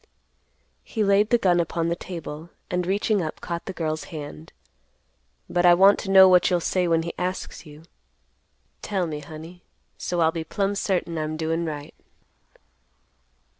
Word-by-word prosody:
He 220 - -2
laid 200 +1 +3
the 240 - +4
gun 180 -6 +2
upon 165 0 -1
the 170 - 0
table, 165 -3 -8 0.2
and 180 -1 -1
reaching 200 +1 +1
up 155 -2 -5
caught 170 0 -5
the - - -3
girl's 155 -3 -3
hand. 145 - -9 1.0
"But 175 - 0
I 175 -1 +7
want 195 +3 +6
to 195 - -6
know 190 -1 +8
what 180 -1 +5
you'll 180 - +2
say 180 +1 0
when 165 -1 +2
he 170 - -5
asks 180 -2 -4
you. 150 +1 -13 1.0
Tell 195 -4 -1
me, 155 -2 -4
honey, 160 +4 -11 0.4
so 175 -1 -1
I'll 160 0 +4
be 165 -1 -4
plumb 195 +4 -1
certain 180 -4 -1
I'm 155 0 -3
doin' 165 +1 -1
right." 150 -2 -6
175 Hz, 165 wpm, -24 LUFS, 160-190 Hz, 1.0 s, know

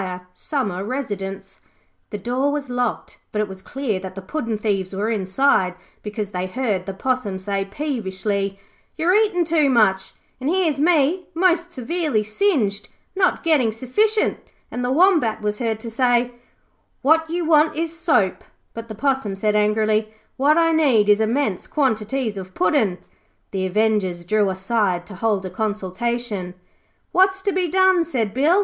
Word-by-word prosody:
Summer 200 - -3
Residence'. 195 -6 -5 0.5
The 210 - -4
door 250 +7 0
was 285 -3 -3
locked, 245 -2 -2
but 210 - -2
it 210 - +1
was 190 -1 -10
clear 240 -3 -3
that 185 0 -8
the 195 - -6
puddin' 230 -1 -3
thieves 200 -3 -1
were 210 +4 -1
inside, 190 -2 +2 0.3
because 210 -1 -5
they 180 0 -2
heard 205 -4 -2
the 195 - -3
Possum 250 -3 -1
say 195 +1 -2
peevishly, 200 -5 -3 0.4
'You're 335 +3 +2
eating 410 -5 +3
too 310 -3 +3
much, 195 -6 +2 0.3
and 265 +3 -2
here's 335 -5 +1
me, 335 +2 +2
most 350 0 +2
severely 300 -4 -1
singed, 215 - 0 0.3
not 380 -1 +1
getting 295 -9 +3
sufficient', 415 - +1 0.3
and 245 - -3
the 245 - 0
Wombat 310 - +3
was 210 0 -1
heard 225 -3 -1
to 230 - -6
say, 245 0 +2 0.7
'What 320 +3 +4
you 345 0 -2
want 310 -1 +4
is 330 +1 -2
soap', 260 - +1 0.3
but 230 0 -7
the 220 - -7
Possum 265 -5 0
said 210 +2 0
angrily, 215 +1 +2 0.2
'What 290 +4 +3
I 330 -1 +4
need 265 -10 +3
is 210 +1 +5
immense 220 -3 0
quantities 230 -4 -1
of 185 0 -10
puddin'.' 185 0 +2 0.5
The 190 -1 -1
avengers 195 -3 0
drew 210 +1 +2
aside 190 -2 0
to 195 - -10
hold 200 0 -1
a 185 - -5
consultation. 210 0 -3 0.6
'What's 380 +1 +3
to 400 - +1
be 370 -1 0
done?' 375 0 +4
said 235 -11 -2
Bill. 310 +9 +3
230 Hz, 155 wpm, -21 LUFS, 200-300 Hz, 0.7 s, is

